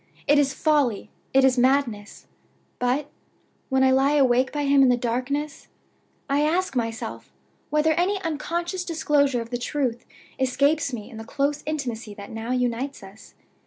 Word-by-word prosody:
It 290 +1 +5
is 280 -1 +2
folly, 285 -9 +1 0.2
it 270 0 +4
is 260 -1 +4
madness; 245 - 0 0.5
but, 255 +4 0 0.6
when 265 -1 +3
I 260 - +5
lie 270 +2 +3
awake 260 -2 +3
by 295 -1 -2
him 280 0 +4
in 265 - +6
the 245 - +3
darkness, 255 +5 -3 0.6
I 280 +1 +1
ask 335 +1 0
myself 230 -2 -4 0.4
whether 305 +1 +2
any 365 +5 +1
unconscious 340 +3 -2
disclosure 295 -7 +1
of 230 +1 -9
the 245 - -2
truth 250 -3 -2 0.4
escapes 280 +3 +1
me 225 -3 -7
in 225 - -10
the 225 - -7
close 280 +5 -1
intimacy 240 -8 -4
that 200 0 -10
now 225 +1 -6
unites 250 0 -2
us? 195 +3 -14
270 Hz, 160 wpm, -24 LUFS, 245-295 Hz, 0.6 s, in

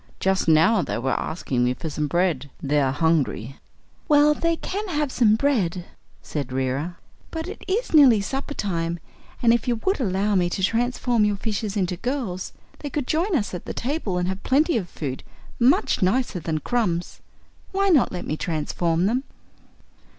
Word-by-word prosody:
Just 190 -2 +1
now 165 +7 +5
they - - -3
were 130 +3 -1
asking 130 -7 -2
me 125 +1 +1
for 160 - -6
some 150 -1 -2
bread. 165 -4 0
They 145 +1 +1
are 135 -1 +2
hungry." 145 -5 0 0.5
"Well, 295 0 +5
they 335 +2 0
can 405 +5 -4
have 300 -5 -1
some 220 -5 +4
bread," 205 -10 0 0.4
said 140 -4 -4
Reera. 135 +7 -2 0.3
"But 325 +1 -5
it 395 - -8
is 425 +4 -1
nearly 270 -8 +7
supper 270 +8 -4
time, 170 -4 -2 0.5
and 230 -1 +6
if 235 0 0
you 240 - +2
would 385 -2 +2
allow 205 -2 0
me 180 -3 +2
to 190 - -3
transform 240 +1 +1
your 210 -1 +2
fishes 210 0 -3
into 180 -2 -1
girls 235 -6 -3 0.3
they 290 - -5
could 290 -2 -2
join 340 +7 0
us 210 -9 -1
at 180 - -6
the - - -5
table 245 - -2
and 180 0 0
have 190 +1 -3
plenty 300 +5 +2
of 190 -7 -2
food 135 -4 -5 0.4
much 250 -1 +3
nicer 195 +1 +1
than 155 -1 -2
crumbs. 180 -8 -1 0.5
Why 395 +1 +2
not 305 -9 +4
let 180 - -5
me 155 - -2
transform 165 +2 -1
them?" 245 +6 +1
195 Hz, 180 wpm, -24 LUFS, 165-265 Hz, 0.5 s, nearly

